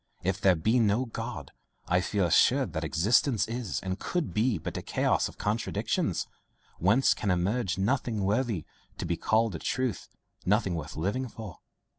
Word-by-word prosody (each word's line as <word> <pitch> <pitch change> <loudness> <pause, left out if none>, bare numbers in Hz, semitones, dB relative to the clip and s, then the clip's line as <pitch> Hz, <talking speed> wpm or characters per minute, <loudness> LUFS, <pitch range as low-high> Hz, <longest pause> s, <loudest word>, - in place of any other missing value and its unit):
If 95 0 -1
there 95 -2 +5
be 110 +10 +2
no 110 +3 +2
God, 115 - -6 0.4
I 90 +1 +3
feel 100 0 0
assured 85 - +3
that - - -2
existence 110 - +2
is 115 -5 -3
and 95 +1 -3
could 175 -4 -2
be 110 0 +2
but 80 - -6
a - - -3
chaos - - +1
of - - -15
contradictions, 105 +3 -1 0.5
whence 105 +10 +4
can 100 - -3
emerge 95 +1 0
nothing 110 +1 0
worthy 105 - 0 0.3
to - - -4
be 85 - 0
called 110 +5 +1
a 80 - -5
truth, 130 -6 -2 0.4
nothing 100 -1 +2
worth 80 -3 -5
living 105 +11 -1
for. 110 -7 -9
105 Hz, 165 wpm, -29 LUFS, 90-120 Hz, 0.5 s, there